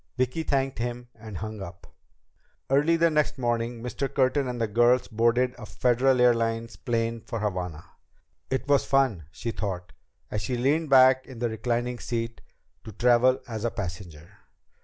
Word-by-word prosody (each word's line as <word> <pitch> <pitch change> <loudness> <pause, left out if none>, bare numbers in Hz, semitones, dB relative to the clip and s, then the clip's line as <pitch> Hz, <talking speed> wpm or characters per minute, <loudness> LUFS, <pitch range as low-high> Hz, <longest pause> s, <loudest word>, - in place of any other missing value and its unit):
Vicki 130 +5 0
thanked 135 -4 -1
him 120 0 -4
and 110 -3 -9
hung 110 +1 -6
up. 85 -2 -9 0.9
Early 150 +5 +4
the 165 0 +3
next 150 -1 +1
morning 120 -1 -2
Mr. 135 +2 -3
Curtin 135 0 +1
and 125 -1 -4
the 115 - +1
girls 120 +4 +3
boarded 120 +2 +2
a 110 - -7
Federal 125 +3 +2
Airlines 115 -1 +2
plane 115 -2 -2
for 115 - -5
Havana. 90 -6 -3 0.6
It 130 +1 -2
was 140 -1 +4
fun, 130 - +1
she 115 +9 -5
thought, 90 -5 -5 0.4
as 105 - -2
she 125 +4 -2
leaned 145 +5 +1
back 130 -1 +6
in 130 - -10
the 120 0 -1
reclining 120 +2 -2
seat, 115 -1 -4 0.4
to 110 - -9
travel 125 +4 +3
as 110 -2 -5
a 120 - +1
passenger. 90 -7 -7
120 Hz, 160 wpm, -26 LUFS, 110-130 Hz, 0.9 s, back